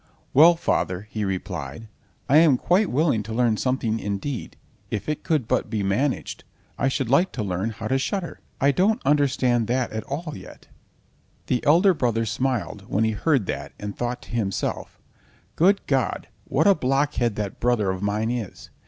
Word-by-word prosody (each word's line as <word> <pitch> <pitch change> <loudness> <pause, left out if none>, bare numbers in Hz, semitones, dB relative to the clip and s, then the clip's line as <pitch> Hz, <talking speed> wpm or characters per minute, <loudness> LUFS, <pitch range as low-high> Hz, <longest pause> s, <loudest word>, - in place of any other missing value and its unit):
"Well, 165 +5 +7
father," 95 - -1
he 110 - -2
replied, 90 -2 -4 0.4
"I 140 - +5
am 155 -5 +6
quite 185 +7 +2
willing 140 -5 +2
to 110 +2 -7
learn 120 -2 +2
something—indeed, 115 -1 -2 0.3
if 105 - -4
it 150 -1 -3
could 155 -9 0
but - - 0
be 105 -3 -1
managed, 125 +8 -1 0.3
I 135 - 0
should 135 -1 -1
like 155 +10 +3
to 110 - -3
learn 95 +2 -2
how 110 0 -6
to 135 +3 +1
shudder. 180 +5 -3 0.2
I 140 +1 +4
don't 205 - +2
understand 130 -5 +2
that 125 0 0
at 110 - -3
all 155 +3 -5
yet." - - -12 0.8
The 125 - -1
elder 180 +6 +6
brother 115 -7 0
smiled 115 -4 -2
when 105 - +1
he 110 - +2
heard 130 +1 +1
that, 70 -4 -5
and 105 -1 -5
thought 120 0 -3
to - - -14
himself: 105 -5 -2 0.6
"Good 195 +4 +3
God, 135 -4 -1 0.2
what 145 +4 +1
a 200 - +7
blockhead 135 - 0
that 105 -2 -4
brother 115 -5 +1
of 95 0 -5
mine 105 +3 0
is! 120 -6 -6
120 Hz, 170 wpm, -24 LUFS, 105-145 Hz, 0.8 s, Well